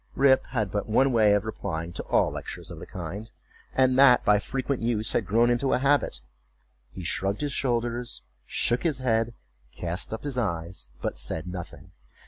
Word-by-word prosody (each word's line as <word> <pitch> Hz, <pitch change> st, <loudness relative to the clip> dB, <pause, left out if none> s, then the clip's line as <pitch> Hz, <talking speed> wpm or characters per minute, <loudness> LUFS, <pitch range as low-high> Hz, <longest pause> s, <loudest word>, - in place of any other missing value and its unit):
Rip 135 Hz, -1 st, +4 dB
had 110 Hz, -7 st, -2 dB
but 105 Hz, +1 st, -2 dB
one 130 Hz, +5 st, +4 dB
way 110 Hz, -3 st, +5 dB
of 105 Hz, +1 st, 0 dB
replying 85 Hz, -6 st, -4 dB
to -, -, -4 dB
all -, -, +2 dB
lectures -, -, -7 dB
of -, -, -8 dB
the -, -, -9 dB
kind, 95 Hz, +6 st, -6 dB, 0.4 s
and 130 Hz, 0 st, +3 dB
that, 130 Hz, -3 st, +7 dB
by 105 Hz, 0 st, +5 dB
frequent 135 Hz, +4 st, -2 dB
use, 115 Hz, -2 st, +1 dB
had 105 Hz, -, 0 dB
grown 115 Hz, +4 st, +4 dB
into 125 Hz, +3 st, +1 dB
a -, -, +4 dB
habit. 140 Hz, -, +1 dB, 0.7 s
He 95 Hz, -, -9 dB
shrugged 95 Hz, -, -1 dB
his 145 Hz, -2 st, -1 dB
shoulders, 120 Hz, -2 st, -1 dB, 0.2 s
shook 120 Hz, -, +1 dB
his 160 Hz, -6 st, +1 dB
head, 115 Hz, -2 st, 0 dB, 0.4 s
cast 85 Hz, +1 st, -3 dB
up 110 Hz, -, -5 dB
his 140 Hz, -4 st, -1 dB
eyes, 85 Hz, -, -3 dB, 0.2 s
but -, -, -2 dB
said 80 Hz, +7 st, -2 dB
nothing. 90 Hz, -2 st, -8 dB
115 Hz, 180 wpm, -27 LUFS, 95-125 Hz, 0.7 s, that